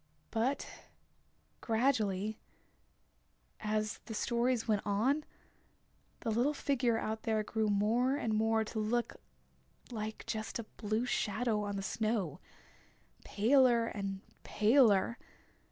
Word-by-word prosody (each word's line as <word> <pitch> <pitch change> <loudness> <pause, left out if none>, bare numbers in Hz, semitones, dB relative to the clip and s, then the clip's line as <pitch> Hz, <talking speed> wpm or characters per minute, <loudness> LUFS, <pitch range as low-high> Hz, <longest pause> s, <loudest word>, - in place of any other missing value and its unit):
But 250 +5 0 0.9
gradually, 220 -4 0 1.2
as 215 0 -1
the 220 - -5
stories 235 +1 0
went 210 -3 +2
on 240 +9 +1 1.0
the 230 - -1
little 250 +7 +1
figure 250 -5 +1
out 220 0 -3
there 220 -1 0
grew 220 +1 -1
more 225 +6 +2
and 225 -6 -1
more 220 +1 +2
to 220 +1 -5
look 230 +3 -1 0.7
like 220 -1 -5
just 215 -3 -3
a 230 - -4
blue 215 +3 -1
shadow 220 -1 0
on 205 0 -3
the 195 - -3
snow, 215 - -1 0.8
paler 240 +2 +4
and 195 -3 -4 0.2
paler. 220 -1 +3
220 Hz, 110 wpm, -33 LUFS, 210-240 Hz, 1.2 s, paler